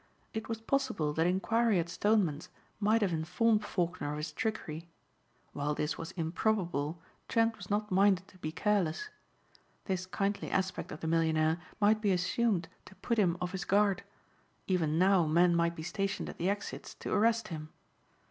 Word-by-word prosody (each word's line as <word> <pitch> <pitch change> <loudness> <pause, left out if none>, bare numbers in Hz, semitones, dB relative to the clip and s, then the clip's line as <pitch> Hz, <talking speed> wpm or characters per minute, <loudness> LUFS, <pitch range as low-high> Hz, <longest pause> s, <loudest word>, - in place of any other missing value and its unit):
It 220 0 -4
was 225 -1 -2
possible 225 - 0
that 160 +2 +2
inquiry 220 +4 +2
at 170 -1 0
Stoneman's 180 -5 +1 0.3
might 215 +1 +3
have 185 -4 +1
informed 210 +7 +2
Faulkner 175 -5 -2
of - - -4
his 150 0 -4
trickery. 170 -3 -4 0.6
While 145 +1 -1
this 150 +1 -1
was 165 - -6
improbable 170 -3 -1 0.3
Trent 225 0 +2
was 200 -4 -11
not 210 0 -1
minded 190 0 +3
to 185 - -19
be 155 -2 -4
careless. 200 - 0 0.8
This 185 -2 -2
kindly 200 +1 -1
aspect 190 -1 -1
of 150 - -7
the 160 - -3
millionaire 160 0 +2 0.2
might 215 +1 +4
be 205 -2 +2
assumed 185 0 +1 0.2
to - - -14
put 230 +5 -1
him 180 -4 +3
off 180 0 -3
his 190 0 -3
guard; 200 -1 +2 0.6
even 160 -5 +1
now 185 -2 +4
men 170 +2 +4
might 170 0 +2
be 160 - -6
stationed 195 +3 -2
at - - -9
the 180 - +1
exits 205 0 -4
to - - -4
arrest 225 0 +2
him. 155 -2 -6
185 Hz, 170 wpm, -32 LUFS, 165-210 Hz, 0.8 s, might